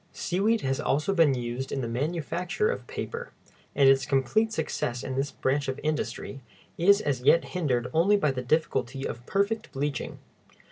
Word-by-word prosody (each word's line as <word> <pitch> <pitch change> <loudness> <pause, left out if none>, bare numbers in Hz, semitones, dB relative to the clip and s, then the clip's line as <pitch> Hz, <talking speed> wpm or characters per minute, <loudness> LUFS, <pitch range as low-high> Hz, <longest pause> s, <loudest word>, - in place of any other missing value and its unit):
Seaweed 205 +5 0
has 135 0 -1
also 150 +8 0
been 160 -7 +4
used 125 +2 -4
in 135 - -2
the 120 - -3
manufacture 170 - -1
of - - -6
paper, 480 +1 -5 0.5
and 140 -1 +5
its 135 0 +5
complete 145 - +2
success 125 - -2
in 130 - -4
this 135 +2 0
branch 140 +2 -1
of 130 +1 -3
industry 150 -3 -3 0.3
is 200 +4 +5
as 135 -4 -1
yet 165 +6 +5
hindered 130 -9 0
only 185 +6 +4
by 150 -8 +2
the 130 -1 -3
difficulty 135 -2 0
of 120 - -7
perfect 200 +3 0
bleaching. 140 -2 -3
145 Hz, 170 wpm, -27 LUFS, 130-180 Hz, 0.5 s, and